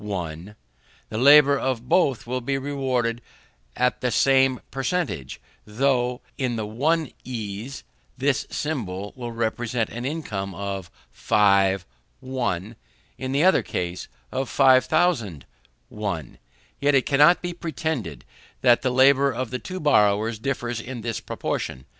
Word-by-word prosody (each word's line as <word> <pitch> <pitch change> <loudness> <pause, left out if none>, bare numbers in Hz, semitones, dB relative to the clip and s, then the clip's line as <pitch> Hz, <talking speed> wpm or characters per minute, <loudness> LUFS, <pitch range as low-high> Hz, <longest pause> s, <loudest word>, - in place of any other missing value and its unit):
the 90 -1 -5 0.6
labour 140 +5 +6
of 125 -2 -2
both 135 -6 +2
will 125 +2 -3
be 135 +3 -1
rewarded 130 -4 -1 0.6
with 125 0 +3
the 125 - 0
same 135 0 +3
per 135 - -4
centage, 135 - -2 0.3
though, 125 +2 0 0.2
in 125 -3 0
the 110 -2 -3
one 150 +8 0
ease, 115 +1 -6 0.3
this 135 0 0
symbol 105 -10 -4
will 120 -2 -6
represent 115 0 -2
an 120 +1 -6
income 105 - -4
of 100 -2 -5 0.3
5_l_., 100 -2 +3 1.4
in 130 0 -3
the 140 +3 +2
other 190 +1 +5
case, 90 0 -4 0.2
of 130 -1 -2
5000_l_. 130 - +3 1.3
Yet 145 0 +3
it 135 - +3
cannot 150 +6 +5
be 175 0 -3
pretended 155 - -4 0.4
that 120 -2 +5
the 130 - +1
labour 135 +2 +4
of 130 0 -4
the 125 - -3
two 185 +6 -6
borrowers 110 - +2
differs 120 -2 -3
in 125 0 -7
this 115 0 -3
proportion. 65 - -4
125 Hz, 130 wpm, -24 LUFS, 105-140 Hz, 1.4 s, labour